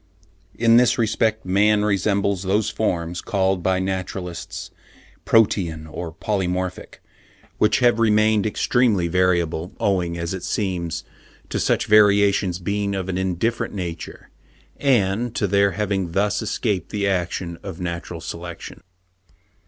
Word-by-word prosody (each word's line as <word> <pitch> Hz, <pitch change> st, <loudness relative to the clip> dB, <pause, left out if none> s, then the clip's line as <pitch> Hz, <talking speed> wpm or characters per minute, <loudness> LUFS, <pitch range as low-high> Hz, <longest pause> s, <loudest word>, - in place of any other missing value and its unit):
In 115 Hz, 0 st, +5 dB
this 125 Hz, 0 st, +4 dB
respect 110 Hz, -1 st, 0 dB
man 105 Hz, +3 st, +3 dB
resembles 100 Hz, -1 st, +1 dB
those 105 Hz, +3 st, 0 dB
forms, 90 Hz, -5 st, -2 dB
called 95 Hz, -2 st, 0 dB
by 95 Hz, +1 st, +1 dB
naturalists 95 Hz, -2 st, -4 dB, 0.5 s
protean 90 Hz, -8 st, +2 dB
or 80 Hz, +1 st, -6 dB
polymorphic, 90 Hz, 0 st, -3 dB, 0.6 s
which 105 Hz, +4 st, +3 dB
have 120 Hz, -2 st, +4 dB
remained 110 Hz, -1 st, +3 dB
extremely 110 Hz, -4 st, +2 dB
variable, 85 Hz, -1 st, 0 dB
owing, 90 Hz, -4 st, 0 dB
as 85 Hz, +1 st, -3 dB
it 95 Hz, -, -5 dB
seems, 85 Hz, -5 st, -2 dB, 0.5 s
to -, -, -2 dB
such -, -, +1 dB
variations 100 Hz, -3 st, +4 dB
being 100 Hz, +2 st, -2 dB
of 95 Hz, -1 st, -3 dB
an 95 Hz, 0 st, -1 dB
indifferent 95 Hz, +6 st, -1 dB
nature, 85 Hz, -3 st, -6 dB, 0.5 s
and 120 Hz, -3 st, +1 dB
to 105 Hz, -, +1 dB
their 100 Hz, 0 st, +2 dB
having 95 Hz, -3 st, -2 dB
thus 100 Hz, +2 st, +1 dB
escaped 100 Hz, -8 st, -2 dB
the 100 Hz, -1 st, -1 dB
action 85 Hz, -2 st, -2 dB
of 95 Hz, -3 st, -8 dB
natural 85 Hz, -1 st, -5 dB
selection. 85 Hz, +1 st, -8 dB
95 Hz, 125 wpm, -22 LUFS, 90-105 Hz, 0.6 s, In